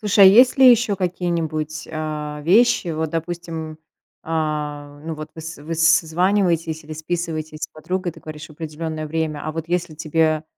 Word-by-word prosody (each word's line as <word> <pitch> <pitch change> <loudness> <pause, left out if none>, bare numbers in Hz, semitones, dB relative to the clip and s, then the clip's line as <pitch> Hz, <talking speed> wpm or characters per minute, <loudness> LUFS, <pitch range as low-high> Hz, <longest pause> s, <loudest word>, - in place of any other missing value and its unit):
Слушай, 205 -2 +5
а - - +11
есть 245 +7 +6
ли 260 -1 +9
ещё 230 -4 +3
какие-нибудь, 170 -4 -2
а, 150 -1 -4
вещи 195 +1 +4
вот, 160 -1 -2
допустим, 165 -1 -5 0.4
а, 150 -2 -3
ну 165 -1 -4
вот 155 0 -8
выс 160 0 -7
выс 165 +2 -3
созваниваетесь 170 -2 +2
или 155 - -8
списываетесь 160 -1 -4
с - - -2
подругой, 180 +2 -4
ты 165 - -15
говоришь 155 0 -8
в - - -20
определенное 155 0 -5
время. 155 -1 -2
А 155 - -3
вот 165 +1 -5
если 175 -2 -1
тебе 155 0 +1
160 Hz, 165 wpm, -21 LUFS, 155-175 Hz, 0.4 s, а